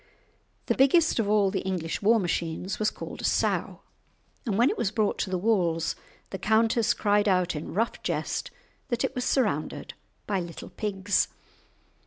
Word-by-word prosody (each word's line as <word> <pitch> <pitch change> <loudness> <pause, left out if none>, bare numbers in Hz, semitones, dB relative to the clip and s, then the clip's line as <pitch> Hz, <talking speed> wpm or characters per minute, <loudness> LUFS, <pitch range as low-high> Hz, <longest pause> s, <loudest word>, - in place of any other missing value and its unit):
The - - +2
biggest 290 +2 +4
of 210 -3 +1
all 205 -2 +3
the 190 - -1
English 180 -4 -3
war 225 +3 +4
machines 175 0 -2
was 215 0 +2
called - - -8
a - - -10
sow, - - 0 0.7
and 200 -3 0
when 240 +4 +4
it - - -3
was 205 - 0
brought 215 -1 0
to - - -1
the 185 - 0
walls 175 -5 +1 0.4
the 190 - -5
countess 220 +1 +2
cried 205 0 +2
out 180 -4 +2
in 150 +3 -6
rough 225 +3 0
jest - - -2 0.4
that 240 -1 -1
it - - -1
was 250 - -2
surrounded 205 - 0 0.3
by 200 -2 0
little 170 -2 -7
pigs. 200 -1 0
205 Hz, 170 wpm, -27 LUFS, 185-225 Hz, 0.7 s, biggest